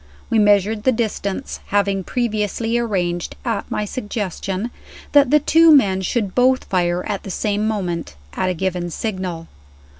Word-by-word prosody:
We 225 - +4
measured 205 +1 +3
the 260 - +3
distance, 220 -1 -3
having 200 -1 +1
previously 225 +1 -1
arranged 180 -7 -1
(at 230 -4 -2
my 210 - -2
suggestion) 205 -1 -4 0.4
that 285 -3 +5
the 300 - +5
two 325 +3 +5
men 200 -10 +5
should 200 0 -1
both 255 +1 +3
fire 175 -1 0
at 205 -2 -3
the - - -9
same 210 +2 -1
moment, 175 - -3 0.2
at 185 - -1
a 180 - -1
given 180 0 -2
signal. 180 -4 -4
205 Hz, 150 wpm, -20 LUFS, 185-230 Hz, 0.4 s, that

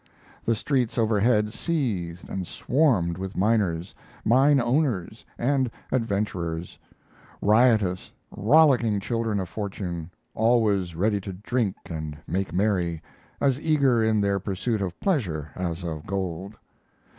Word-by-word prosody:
The 115 - +2
streets 125 0 0
overhead 110 -1 +2
seethed 100 - -2
and 95 -2 -4
swarmed 110 - +1
with 95 0 -5
miners, 95 -4 +1 0.3
mine 135 +5 +5
owners, 120 - 0
and 130 0 +1 0.2
adventurers 100 -8 -2 0.6
riotous, 105 -4 +3 0.2
rollicking 120 -4 +4
children 115 0 -1
of 95 - -3
fortune, 90 -5 -5 0.2
always 105 -6 +2
ready 100 +3 +1
to 95 0 -6
drink 105 +1 -1
and 80 -3 -5
make 95 +3 -2
merry, 90 -4 0 0.4
as 135 -2 +2
eager 140 -7 +3
in 110 -1 +2
their 100 -1 +1
pursuit 100 +3 -2
of 90 -3 -4
pleasure 90 - -1
as 90 -1 -3
of 80 -3 -5
gold. 95 +1 -3
105 Hz, 120 wpm, -25 LUFS, 90-120 Hz, 0.6 s, mine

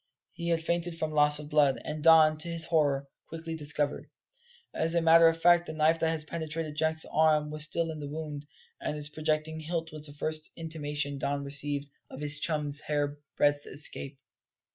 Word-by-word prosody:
He 170 -1 -6
had 165 -1 +1
fainted 170 0 -2
from 155 -1 -2
loss 150 -1 +3
of 150 0 -8
blood, 145 -4 +3
as 150 - -4
Don, 160 0 +6
to 165 - -6
his 165 -1 -1
horror, 145 -4 +1 0.2
quickly 165 0 -6
discovered. 150 -1 -1 0.6
As 165 +1 0
a - - +4
matter 165 0 +7
of 165 0 +1
fact, 175 +1 +4
the - - -5
knife 160 +1 +3
that 165 - +1
had 160 -2 -3
penetrated 160 -1 -5
Jack's 160 +1 0
arm 155 -1 +2
was 155 0 +3
still 165 +1 -2
in 155 - -7
the 145 -1 -6
wound, 150 -1 -6 0.3
and 150 - -3
its 150 0 -5
projecting 155 +1 -2
hilt 160 +1 -4
was 155 0 -4
the 145 - -11
first 155 +1 -1
intimation 145 -3 -4
Don 140 +1 -2
received 140 0 -1 0.2
of - - -10
his 145 0 +1
chum's 150 -2 +2
hairbreadth 145 0 -1
escape. 140 -1 -3
155 Hz, 185 wpm, -29 LUFS, 145-160 Hz, 0.6 s, matter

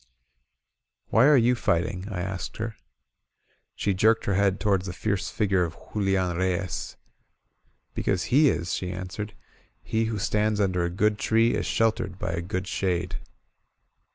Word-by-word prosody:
"Why 120 +5 +5
are 150 -2 +7
you 120 0 +4
fighting?" 90 -4 -1
I 95 -4 -3
asked 95 0 -5
her. 110 0 -4 1.0
She 100 - 0
jerked 110 +4 +3
her 100 - +1
head 100 0 +2
toward 100 -4 +2
the 90 - -4
fierce 100 0 -2
figure 100 -4 +1
of 85 -1 -3 0.2
Ju 105 - -2
lian 95 -3 +1
Reyes. 95 0 -2 1.0
"Because 95 -3 0
he 145 +1 +6
is," 85 -5 -1
she 90 -1 -2
answered. 95 +3 -6 0.5
"He 110 0 0
who 110 -1 -2
stands 105 +1 +1
under 90 -3 +1
a 85 - 0
good 105 +4 +1
tree 115 +1 +3
is - - -1
sheltered 110 -5 0
by - - -3
a 85 +1 -2
good 95 +1 -3
shade." 90 -2 -1
95 Hz, 155 wpm, -26 LUFS, 90-110 Hz, 1.0 s, are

